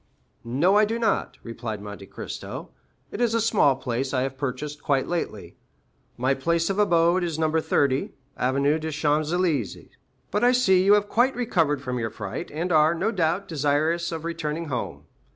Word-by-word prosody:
"No, 150 - +2
I 210 - +5
do 225 +2 -2
not," 230 -1 0
replied 115 -2 -5
Monte 100 -1 -9
Cristo; - - -7 0.4
"it 220 - -5
is 235 -2 +2
a - - +3
small 210 -11 +3
place 130 +1 -3
I 130 - +1
have 135 0 -3
purchased 145 +2 -4
quite 135 -2 +1
lately. 175 -1 -4 0.6
My 130 +2 +2
place 170 +6 0
of 195 - -2
abode 175 -2 +3
is 165 -3 -2
No. 160 -1 +1
30, 140 -3 +1 0.3
Avenue 140 +4 +1
des 160 0 -4
Champs 150 0 0
Élysées; 165 - -1 0.4
but 210 +3 0
I 245 +1 +5
see 190 -7 +4
you 200 +2 +6
have 205 0 +1
quite 245 +5 +2
recovered 165 - 0
from 125 -2 -3
your 115 -1 -2
fright, 105 - -6
and 165 +4 -3
are, 155 +1 +4
no 195 +7 0
doubt, 180 -1 0
desirous 155 +3 0
of 165 -1 -5
returning 165 -1 -3
home. 125 -3 -4
160 Hz, 180 wpm, -25 LUFS, 135-185 Hz, 0.6 s, you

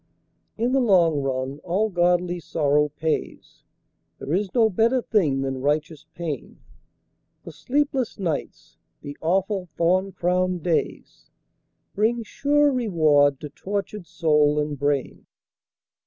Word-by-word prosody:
In 235 +3 0
the 270 - +3
long 175 - +3
run 135 +1 -3
all 190 +6 -1
godly 175 0 +1
sorrow 150 -2 +1
pays, 155 +2 -4 0.6
There 145 - -5
is 195 +1 0
no 230 -2 +5
better 225 +5 +2
thing 165 - +1
than 135 -1 -3
righteous 150 +2 -2
pain, 165 -5 -6 0.8
The - - -9
sleepless 275 -3 -1
nights, 170 -7 -5 0.3
the 145 0 -7
awful 190 +2 0
thorn 185 +3 +2
crowned 180 -1 -1
days, 170 -3 -3 0.6
Bring 230 +3 0
sure 285 +5 +2
reward 155 - +2
to 150 - -6
tortured 200 +3 -5
soul 150 -2 +2
and 150 0 -2
brain. 145 -2 -2
175 Hz, 120 wpm, -23 LUFS, 150-210 Hz, 0.8 s, no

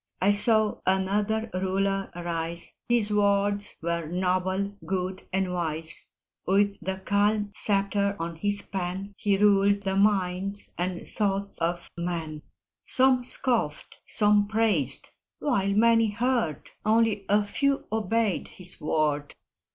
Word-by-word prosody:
I 195 +2 +4
saw 215 +1 +3
another 205 +4 +1
Ruler 195 +1 0
rise 170 -1 -4 0.2
His 225 -3 +3
words 205 0 +1
were 170 -1 -1
noble, 185 +3 -1
good, 185 0 -3
and 190 -1 0
wise; 160 -2 -4 0.4
With 200 +1 +2
the 190 +2 -2
calm 205 +1 +1
sceptre 200 -1 +1
of 165 0 -4
his 205 +1 0
pen 190 +1 -4
He 200 0 +1
ruled 200 0 +4
the 195 0 -1
minds 195 -1 0
and 180 0 -3
thoughts 200 -1 -2
of 170 +1 -2
men; 165 -3 -4 0.4
Some 260 -1 +4
scoffed, 240 - -2
some 210 -1 +3
praised 205 - +1 0.3
while 200 -9 0
many 230 +1 +4
heard, 230 - -1
Only 220 -2 +2
a 205 +1 +4
few 275 +6 0
obeyed 220 -2 0
his 180 -1 -6
word. 150 -1 0
200 Hz, 120 wpm, -27 LUFS, 180-210 Hz, 0.4 s, I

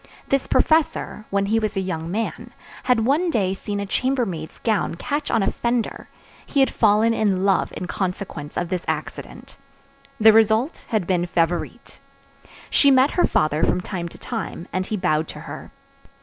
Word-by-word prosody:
This 275 -1 +1
professor, 315 -8 +1
when 200 0 +1
he 220 +3 +2
was 215 -2 -2
a - - +3
young 165 -4 -3
man, 220 +5 -3 0.3
had 235 -3 +3
one 310 +8 +2
day 195 - +1
seen 205 +1 -4
a 200 - -2
chambermaid's 210 -9 -2
gown 220 -6 0
catch 290 - -3
on 210 - +2
a - - +1
fender; 235 -1 -2 0.3
he 280 - -2
had 270 - +4
fallen 220 +1 +3
in 195 -4 +1
love 195 -1 +2
in - - -4
consequence 180 -5 -4
of 175 -1 -2
this 180 -1 -2
accident. - - -5 0.6
The 220 0 +7
result 225 +6 +2
had 215 -6 0
been 180 -1 0
Favourite. 170 0 -2 0.7
She 280 - +5
met 265 +1 +5
her 355 - +3
father 155 0 +1
from - - +2
time 180 -2 -5
to - - -14
time, 220 -6 -5
and 185 +1 -1
he 215 - -2
bowed 160 -4 +1
to - - -9
her. - - -9
205 Hz, 175 wpm, -22 LUFS, 180-235 Hz, 0.7 s, The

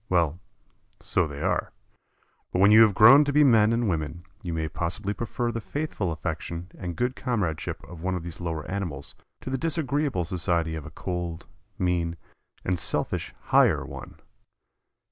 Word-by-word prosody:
Well, 85 -2 +2 0.6
so 90 - 0
they 70 -1 -6
are, - - 0 0.8
but - - -1
when 100 +3 +6
you 110 +1 +9
have 105 -3 +6
grown 130 +8 +9
to 145 - -1
be 150 +1 +5
men 110 -5 +5
and 115 0 +1
women 80 -1 -2 0.2
you 90 -5 -4
may 80 -1 -1
possibly 90 +6 -2
prefer 120 +2 -2
the 115 0 -4
faithful 140 - -3
affection 85 +3 -5
and 90 -2 -5
good 125 +2 -1
comradeship 105 - -2
of 85 -2 -11
one 95 +1 -1
of 90 - -4
these 85 0 -6
lower 80 -3 -3
animals 85 -9 -3 0.3
to 130 - -6
the 135 - -1
disagreeable 145 - 0
society 85 -1 0
of 80 -2 -6
a - - -7
cold, 85 -2 -4 0.3
mean, 85 -2 0 0.5
and 90 -1 0
selfish - - 0
"higher" - - +4
one. - - -10
90 Hz, 165 wpm, -26 LUFS, 85-115 Hz, 0.8 s, you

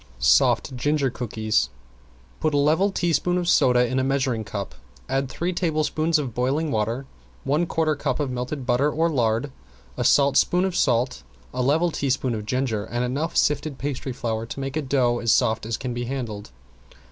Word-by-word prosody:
~SOFT 120 - +3
GINGER 140 +1 0
COOKIES~ 110 -3 -1 0.7
Put 155 -2 0
a - - +3
level 160 +8 +3
teaspoon 175 0 +1
of 175 -1 -1
soda 125 -7 +4
in 130 +2 -1
a - - +1
measuring 130 -4 0
cup, 100 -2 -5 0.3
add 135 0 -1
three 175 +6 -2
tablespoons 160 -1 +1
of 135 -6 -3
boiling 140 +6 0
water, 115 +4 -1 0.4
one 150 +5 +1
quarter 160 -2 +1
cup 145 - -2
of 140 -3 -1
melted 125 +2 -4
butter 125 +4 +2
or 165 +3 +1
lard, 120 0 0 0.5
a - - -1
saltspoon 140 +6 +4
of 190 -2 -2
salt, 125 -2 +1 0.3
a 125 - -1
level 160 +7 +2
teaspoon 130 -4 -1
of 105 -1 -5
ginger, 125 -4 -1
and 120 +1 -2
enough 145 +7 -2
sifted 150 -1 +1
pastry 135 -1 -4
flour 115 -2 -3
to 135 - -7
make 135 +1 -4
a 155 - 0
dough 125 -4 +1
as 115 - +1
soft 110 -3 +2
as 115 - -2
can 125 -1 -4
be 120 0 -3
handled. 120 - -5
135 Hz, 180 wpm, -24 LUFS, 120-150 Hz, 0.7 s, soda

